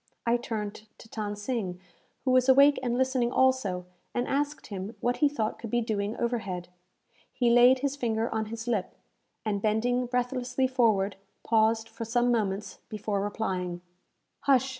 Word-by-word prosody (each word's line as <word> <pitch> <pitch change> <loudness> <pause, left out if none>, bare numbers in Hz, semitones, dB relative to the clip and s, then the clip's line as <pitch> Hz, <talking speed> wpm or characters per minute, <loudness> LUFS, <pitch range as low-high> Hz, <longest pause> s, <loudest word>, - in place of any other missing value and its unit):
I 235 0 +3
turned 215 -3 -4
to - - -14
Than 210 -2 -4
Sing, 205 -4 -3 0.5
who 260 - +3
was 255 0 +4
awake 280 +2 +7
and 245 -1 -1
listening 260 -2 +1
also, 255 -10 +2 0.3
and 245 - 0
asked 285 0 -1
him 200 +1 -6
what 245 +2 0
he 295 - +4
thought 225 -7 -2
could 230 - -6
be 240 - +1
doing 215 -1 -2
overhead? 195 -7 -2 0.6
He 245 -2 +2
laid 245 +2 +6
his 280 0 0
finger 230 -4 0
on 220 0 -1
his 230 +2 -7
lip, 215 -6 -1 0.5
and, 205 -2 -1
bending 245 +4 +1
breathlessly 250 +1 0
forward, 220 -7 +2 0.3
paused 225 0 +2
for 225 +1 -7
some 240 +2 +2
moments 210 -3 -1
before 210 -1 -2
replying. 185 -4 -2 0.6
"Hush!" 265 -1 +3
230 Hz, 160 wpm, -28 LUFS, 210-250 Hz, 0.6 s, awake